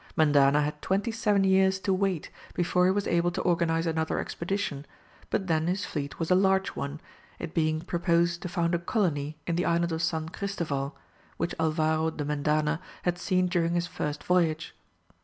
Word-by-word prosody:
Mendana 145 -2 +5
had 150 0 -3
twenty 200 +5 0
seven 210 -3 +2
years 190 0 +4
to 190 +1 +1
wait 190 -4 -1 0.2
before 180 +1 +2
he 185 - +4
was 200 +1 0
able 170 0 +2
to 175 - -3
organize 165 -2 +1
another 160 -1 0
expedition, 170 -6 -3 0.4
but 195 - 0
then 160 -2 +1
his 190 +3 -1
fleet 140 -2 -4
was 165 +1 -2
a - - +8
large 190 0 +3
one, 140 +2 -5 0.4
it 165 - -6
being 155 -1 +1
proposed 170 0 +1
to 180 - -4
found 170 0 0
a 170 - +2
colony 155 - -1
in 170 -1 -1
the 175 - +1
island 170 0 +1
of 160 0 -2
San 160 -1 -1
Christoval 160 -8 -3 0.4
which 170 +2 -1
Alvaro 160 0 +1
de 155 -2 -4
Mendana 150 +2 +1 0.2
had 175 0 0
seen 185 0 +1
during 175 -1 +1
his 175 0 +1
first 150 -4 -4
voyage. 165 -3 +1
170 Hz, 180 wpm, -28 LUFS, 155-180 Hz, 0.4 s, a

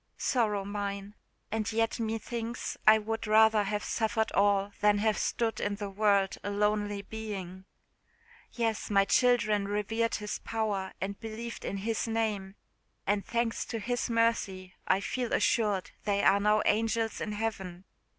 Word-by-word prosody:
Sorrow 210 -6 +1
mine! 200 0 -4 0.4
and 220 0 -1
yet 225 +1 0
me 225 0 -1
thinks 235 +1 -4
I 215 0 +9
would 220 +1 -3
rather 220 0 +5
have 210 +1 -2
suffered 220 0 0
all 200 0 +2
than 210 0 +4
have 215 +1 +2
stood 225 +2 -1
in 205 0 -1
the 200 -1 -5
world 200 -1 +2
a - - -2
lonely 205 0 0
being. 195 -4 -6 0.9
Yes, 225 -3 -1
my 200 -1 +4
children 215 -4 +3
revered 225 +3 0
His 210 -1 -4
power 210 -4 -2
and 195 +1 -4
believed 225 +1 -6
in 200 - -3
His 225 +3 -2
name, 215 -4 -1 0.5
and, 200 0 +1
thanks 235 -1 -1
to 230 - -4
His 245 +4 -2
mercy, 215 -5 0
I 190 +1 +3
feel 245 +3 -2
assured 205 -5 +1
they 200 -1 +1
are 200 +1 +5
now 210 +1 +3
angels 225 +1 +1
in 210 - -3
heaven! 195 -4 -4
210 Hz, 150 wpm, -30 LUFS, 200-225 Hz, 0.9 s, I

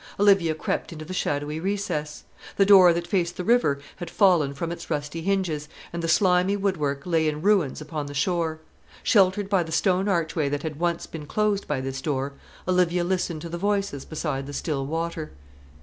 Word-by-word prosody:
Olivia 195 -6 +4
crept - - -3
into 155 -2 -8
the 185 - -6
shadowy 145 -2 -2
recess. 175 -6 -3 0.3
The 195 - +5
door 190 -3 +8
that 170 0 -1
faced 175 -2 -1
the 180 - -3
river 230 -10 +3 0.2
had 175 - -6
fallen 170 -9 +3
from 165 +4 -3
its 170 - -7
rusty 150 +1 -3
hinges, 170 -5 -1 0.2
and 170 - -3
the 165 - -2
slimy 185 +3 +3
woodwork 150 -8 -1
lay 165 -3 +2
in 150 +1 -5
ruins 190 -10 +2
upon 150 -1 -5
the 145 - -8
shore. 160 +1 0 0.4
Sheltered 195 -1 +3
by 195 -2 +2
the 165 -1 -5
stone 190 +3 +2
archway 160 -5 0
that 145 0 -3
had 155 -2 -5
once 170 -1 0
been 150 -3 -8
closed 210 +2 0
by 140 -3 -1
this 135 0 -4
door, 140 -1 -2 0.3
Olivia 180 -1 +2
listened 175 -3 -1
to 170 - -6
the 170 +1 -5
voices 200 -7 -1
beside 150 -4 -4
the 145 - -7
still 140 -2 -2
water. 165 0 -3
170 Hz, 190 wpm, -25 LUFS, 150-185 Hz, 0.4 s, door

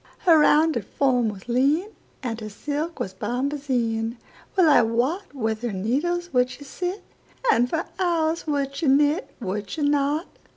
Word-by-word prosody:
Her 330 -3 +7
rounded 310 +1 +4
form 250 -5 +1
was 200 +1 -9
lean, 280 - +2 0.3
And 230 -2 -3
her 215 - -5
silk 295 +9 -4
was 190 - -3
bombazine:Well 245 - -1
I 300 - +7
wotWith 235 - -1
her 240 -2 -2
needles 295 - -1
would 250 0 +3
she 285 - -10
sit, 360 +7 -4 0.5
And 245 +1 +3
for 325 +4 -1
hours 335 -3 0
would 280 -2 -1
she 310 - -1
knit,—Would 265 - +1
she 300 - -3
not? 290 +3 +1
280 Hz, 140 wpm, -24 LUFS, 235-320 Hz, 0.5 s, Her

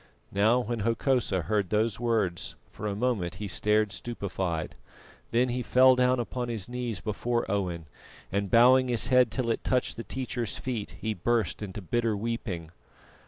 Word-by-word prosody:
Now, 110 +5 +4
when 120 -1 -2
Hokosa 115 - +1
heard 105 -2 0
those 110 +1 +1
words, 110 -7 -1 0.2
for 105 - -5
a 100 - -2
moment 105 -7 -1
he 105 +2 -5
stared 105 +2 +1
stupefied; 95 -6 -3 0.6
then 125 +2 +2
he 125 +1 -1
fell 130 +2 +6
upon 125 -1 0
his 110 -5 -4
knees 120 -4 -3
before 120 +4 -1
Owen, 90 -5 -2 0.5
and 100 0 -1
bowing 130 +3 +6
his 120 -3 +1
head 125 -2 +6
till 115 +1 -1
it - - -2
touched 125 -1 0
the 115 - -4
teacher's 120 -4 -3
feet, 120 -5 -4
he 110 0 -1
burst 110 +2 0
into 100 -1 -6
bitter 115 +3 0
weeping. 100 -7 -4
115 Hz, 160 wpm, -28 LUFS, 100-120 Hz, 0.6 s, fell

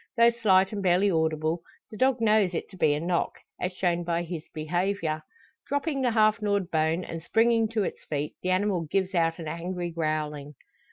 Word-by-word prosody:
Though 235 0 +6
slight 195 -4 +3
and 205 - -3
barely 190 +2 +3
audible, 160 0 0 0.3
the - - -8
dog 255 0 +2
knows 210 -5 +3
it - - -3
to - - -12
be 150 -5 +3
a - - -2
knock, 170 +2 -1 0.2
as 180 - -1
shown 175 -1 0
by 170 0 -1
his 170 -2 -5
behaviour. 165 0 -1 0.5
Dropping 285 0 -1
the 250 - +2
half 215 -1 +3
gnawed 200 -3 0
bone, 160 +2 +1
and 165 -1 -6
springing 225 +5 +3
to 220 -2 0
its - - -5
feet, 150 0 -3
the 185 - -2
animal 185 -1 +1
gives 195 +1 0
out 165 -2 +1
an 165 -3 -7
angry 175 +2 -4
growling. 150 -3 -3
180 Hz, 190 wpm, -27 LUFS, 165-210 Hz, 0.5 s, Though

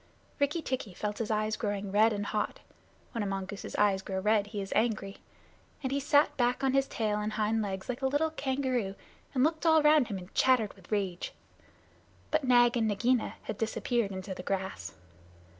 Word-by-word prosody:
Rikki 295 +4 +1
tikki 235 -8 -3
felt 210 0 -3
his 230 - -2
eyes 215 0 0
growing 205 -2 -3
red 215 +3 +5
and 205 -1 -2
hot 210 0 -2 0.5
(when 230 - -3
a 205 - -1
mongoose's 195 +1 -5
eyes 200 -2 +3
grow 190 0 -3
red, 210 +1 +2
he 210 0 -5
is 195 -1 -4
angry), 215 -3 0 0.7
and 260 - -1
he 280 - +1
sat 290 +1 +3
back 245 +1 +1
on 265 -1 +2
his 275 0 +3
tail 210 -2 -1
and 210 +1 -2
hind 220 +1 +1
legs 190 -2 -4
like 250 +1 -4
a 265 - +2
little 295 +4 +1
kangaroo, 260 -8 -1 0.4
and 255 - +3
looked 315 +1 +1
all 320 -2 +5
round 300 -4 +5
him, 200 - -4
and 180 +1 -11
chattered 250 -5 +3
with - - -19
rage. 195 -4 -2 1.0
But 310 -1 +2
Nag 245 -2 +5
and 225 -2 +2
Nagaina 235 +4 +1
had 210 - -5
disappeared 225 -1 0
into 190 0 -5
the 180 - -7
grass. 185 - -4
220 Hz, 190 wpm, -30 LUFS, 200-260 Hz, 1.0 s, red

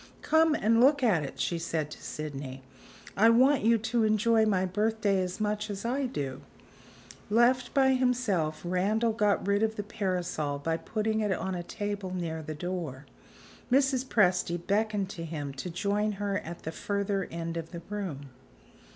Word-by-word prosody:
"Come 320 0 +4
and 230 -1 +3
look 280 +1 +5
at 200 -10 +3
it," 140 -2 -7
she 170 - -1
said 155 -2 -2
to - - -10
Sydney; 135 -3 -6 0.5
"I 220 +3 +6
want 260 +4 +5
you 230 +2 +4
to 225 +1 0
enjoy 220 +1 +3
my 190 -3 +2
birthday 205 0 +1
as 180 +2 -4
much 210 0 -1
as 200 +1 -5
I 260 +3 0
do." 140 - -4 0.9
Left 240 +3 +3
by 265 -1 +5
himself, 240 -12 0
Randal 210 +6 +1
got 210 -2 +1
rid 200 +1 +2
of 220 0 +1
the 205 - -3
parasol 180 -8 -2
by 160 +3 -1
putting 220 +3 -1
it 210 -2 0
on 190 +1 -2
a 175 - -3
table 205 0 -4
near 165 -3 -3
the 155 0 -6
door. 155 -5 -5 0.7
Mrs. 265 -1 +3
Presty 180 -8 +2
beckoned 205 +2 0
to 170 -4 -6
him 150 -4 -5
to 135 +7 -5
join 205 +4 0
her 200 0 -2
at 170 +1 -9
the 160 - -4
further 200 +1 -2
end 165 0 -4
of 165 -1 -5
the 170 -2 -8
room. 170 -10 -5
200 Hz, 170 wpm, -29 LUFS, 170-220 Hz, 0.9 s, I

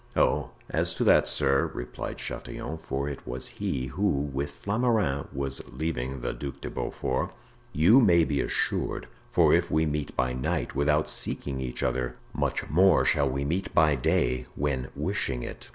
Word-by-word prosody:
"Oh, - - +2 0.2
as - - 0
to - - 0
that, - - +5
sir," 70 0 +2
replied 60 +1 -5
Chatillon 80 +1 -5
(for 70 -3 -3
it 70 -2 -4
was 60 +1 -3
he 65 - -3
who, 95 +11 -1 0.3
with 70 +2 -2
Flamarens, 100 - 0
was 70 0 -3
leaving 65 -2 -3
the 60 - -2
Duc 70 -2 -6
de - - -6
Beaufort), 65 - -2 0.4
"you 90 - +6
may 85 -7 +5
be 70 -3 0
assured; - - -1 0.2
for - - +4
if - - +3
we 80 +1 +2
meet 75 -1 -2
by 65 0 +1
night 65 0 -2
without 75 +2 +2
seeking 65 -2 -2
each 60 -1 -3
other, 60 -1 -1 0.2
much - - -1
more 90 +2 +5
shall 70 -1 +3
we 70 +2 -2
meet 90 +7 -2
by 80 -1 +5
day 65 -1 +1
when 70 -3 -1
wishing - - -1
it." - - -8
70 Hz, 170 wpm, -27 LUFS, 65-80 Hz, 0.4 s, you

